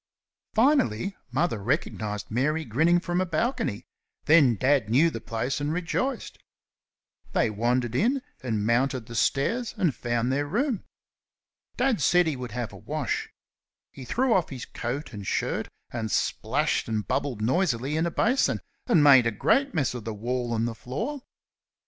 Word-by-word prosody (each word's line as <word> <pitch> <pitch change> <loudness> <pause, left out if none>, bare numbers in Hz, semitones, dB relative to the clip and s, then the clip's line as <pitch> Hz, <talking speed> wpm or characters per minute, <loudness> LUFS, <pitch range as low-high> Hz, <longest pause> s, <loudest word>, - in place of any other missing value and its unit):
Finally 215 - +2
Mother 130 -4 0
recognised 110 -5 -2
Mary 150 +7 0
grinning 160 +10 +3
from 175 0 -1
a - - +1
balcony, 225 - -1 0.4
then 145 -7 +6
Dad 130 -1 +2
knew 150 +9 +4
the 115 - -6
place 115 +5 -2
and 145 +1 -1
rejoiced. 180 +10 -2 0.9
They 110 - +2
wandered 120 +2 0
in 250 - +1 0.2
and 110 -5 -1
mounted 125 +1 +1
the 115 - -10
stairs 225 - 0
and 180 -8 +2
found 120 +1 -1
their 145 +2 0
room. 230 - -1 0.9
Dad 250 - +1
said 175 +6 +4
he 160 -3 -1
would 125 -1 -6
have 120 -2 -4
a - - -9
wash. - - -3 0.6
He 135 - -10
threw 245 - +1
off 180 -6 +2
his 130 -3 -6
coat 130 +4 -5
and 100 -2 -7
shirt - - -1 0.2
and 110 -2 -3
splashed - - 0
and 110 -2 -2
bubbled 125 -7 -1
noisily 135 - +1
in 160 +2 +1
a - - -3
basin, 250 +9 +2 0.3
and 195 - +5
made 135 -5 +7
a - - +1
great 270 - +1
mess 145 -7 +1
of 120 -3 -6
the 110 0 -5
wall 120 +2 -2
and 115 +1 0
the 120 - -3
floor. 225 - -4
135 Hz, 160 wpm, -26 LUFS, 115-175 Hz, 0.9 s, made